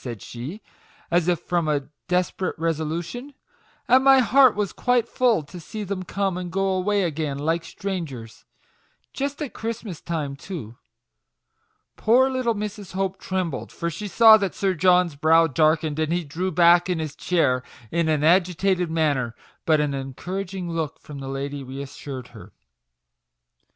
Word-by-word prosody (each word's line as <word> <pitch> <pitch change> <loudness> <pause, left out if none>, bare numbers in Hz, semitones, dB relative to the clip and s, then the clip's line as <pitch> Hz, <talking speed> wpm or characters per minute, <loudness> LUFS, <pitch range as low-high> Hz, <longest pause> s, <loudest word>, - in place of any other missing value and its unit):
37 125 - -4
said 100 - -19
she, 140 - -7 0.5
as 175 0 +2
if 175 -2 +1
from 175 -3 -1
a 145 -2 0 0.2
desperate 180 +1 -1
resolution, 165 - -3 0.2
'* - - -35
and 255 +2 +5
my 270 0 +7
heart 260 -1 +5
was 205 -2 -2
quite 245 -2 +1
full 235 -11 +2
to 175 +5 -11
see 210 +6 -6
them 195 -1 -4
come 190 0 -2
and 180 -1 -6
go 195 +1 0
away 195 +2 +1
again 155 -4 -2
like 165 +3 0
strangers 155 - -6 0.7
just 280 +2 -3
at 280 - -6
Christmas 225 -6 -5
time, 150 -5 -3
too 140 - -8 0.6
\" - - -48
Poor 255 +4 +4
little 255 -3 0
Mrs. 210 -2 -6
Hope 190 0 -2
trembled, 185 -7 -3
for 170 0 -3
she 205 +6 -5
saw 220 +3 +8
that 195 -4 -2
Sir 195 -1 +1
John's 180 -1 +3
brow 160 +3 +5
darkened, 155 0 +1
and 155 0 0
he 175 0 0
drew 165 +5 -3
back 175 +1 +5
in 180 - +1
his 155 -3 -4
chair 140 -8 +1 0.3
in 170 -1 +1
an 150 -2 +1
agitated 180 +1 +2
manner; 145 -7 0 0.3
but 155 -2 +4
an 150 -1 0
encouraging 180 +7 -5
look 160 -3 -3
from 145 -2 -10
the 135 - -6
lady 140 +1 -4
re 130 +1 -8
assured 135 -2 -7
her. - - -13
175 Hz, 165 wpm, -24 LUFS, 150-195 Hz, 0.7 s, saw